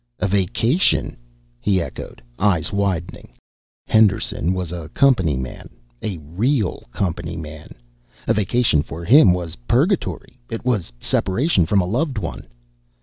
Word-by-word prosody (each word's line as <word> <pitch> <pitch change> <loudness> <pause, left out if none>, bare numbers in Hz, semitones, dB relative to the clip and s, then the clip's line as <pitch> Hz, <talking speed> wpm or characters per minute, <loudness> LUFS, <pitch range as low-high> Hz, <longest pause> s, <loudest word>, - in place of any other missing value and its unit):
"A 105 - 0
vacation?" 100 - +1 0.4
he 95 +6 +2
echoed, 70 -7 -7 0.2
eyes 90 -5 +1
widening. 90 -4 -2 0.5
Henderson 105 -5 +2
was 90 -3 -3
a 85 -3 -6
company 95 - +3
man, 65 0 -7 0.3
a 100 -5 -3
real 100 - -1
company 85 +1 -3
man. 80 -1 -9 0.5
A - - +4
vacation 105 -5 +2
for 80 +3 -7
him 120 - +7
was 90 -3 -3
purgatory, 145 - 0
it 115 0 -5
was 105 - 0
separation 95 - +1
from 100 +1 +3
a - - -1
loved 130 - -1
one. 80 - -5
95 Hz, 130 wpm, -21 LUFS, 85-115 Hz, 0.5 s, him